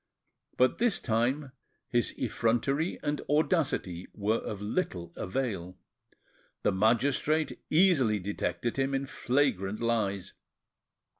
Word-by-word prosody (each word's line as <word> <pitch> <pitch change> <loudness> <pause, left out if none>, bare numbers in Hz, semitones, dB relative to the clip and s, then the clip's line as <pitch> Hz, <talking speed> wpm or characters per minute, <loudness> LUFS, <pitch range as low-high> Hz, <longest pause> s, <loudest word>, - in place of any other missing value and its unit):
But 130 - +3
this 235 -3 +3
time 130 +5 0 0.4
his 120 -1 0
effrontery 125 - 0
and 145 0 -1
audacity 145 - +1
were 110 +2 +1
of 105 - -5
little 100 - -3
avail, 95 -5 -3 0.9
the - - +3
magistrate 130 +9 +1
easily 155 - +4
detected 100 +2 -2
him 135 0 +1
in 135 0 -1
flagrant 120 -8 0
lies. 110 -5 -1
120 Hz, 100 wpm, -29 LUFS, 100-140 Hz, 0.9 s, easily